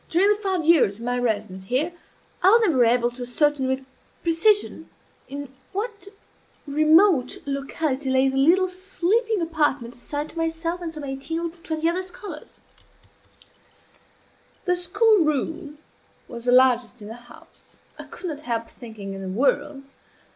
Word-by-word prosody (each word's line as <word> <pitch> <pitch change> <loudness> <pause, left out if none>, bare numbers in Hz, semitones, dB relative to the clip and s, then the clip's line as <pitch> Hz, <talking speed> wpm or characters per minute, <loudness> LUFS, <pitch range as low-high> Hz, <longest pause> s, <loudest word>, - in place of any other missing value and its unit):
During 370 +5 +3
the 420 - +3
five 375 -5 -1
years 305 -12 +4
of 230 - -8
my 245 0 0
residence 210 -5 -2
here 280 - 0 0.5
I 375 - +6
was 460 +3 +6
never 315 - +3
able 240 +1 +3
to 245 +1 -12
ascertain, 265 +2 +1
with 265 0 -2 0.4
precision, 400 +6 +2 0.4
in 280 0 -7 0.2
what 415 0 -4 0.6
remote 310 -1 +4
locality 275 0 -2
lay 260 +1 +3
the 265 - -1
little 340 +8 +4
sleeping 390 +4 -1
apartment 295 -7 0
assigned 290 +5 -5
to 335 - -7
myself 330 +2 -2
and 335 -2 -4
some 305 -2 -8
eighteen 280 +4 -4
or 340 - -2
twenty 325 -1 -3
other 345 +2 0
scholars. 365 -3 -10 2.1
The 360 -1 +2
school 415 +5 +3
room 305 +1 -2 0.5
was 235 -1 -8
the 245 - +3
largest 250 -1 +4
in - - -8
the 220 - -7
house 240 0 -16 0.2
I - - -8
could - - -10
not 300 -3 -5
help 230 -4 -3
thinking, 220 -5 -9
in 195 - -7
the 190 - -5
world. 275 +6 0
295 Hz, 155 wpm, -24 LUFS, 250-350 Hz, 2.1 s, I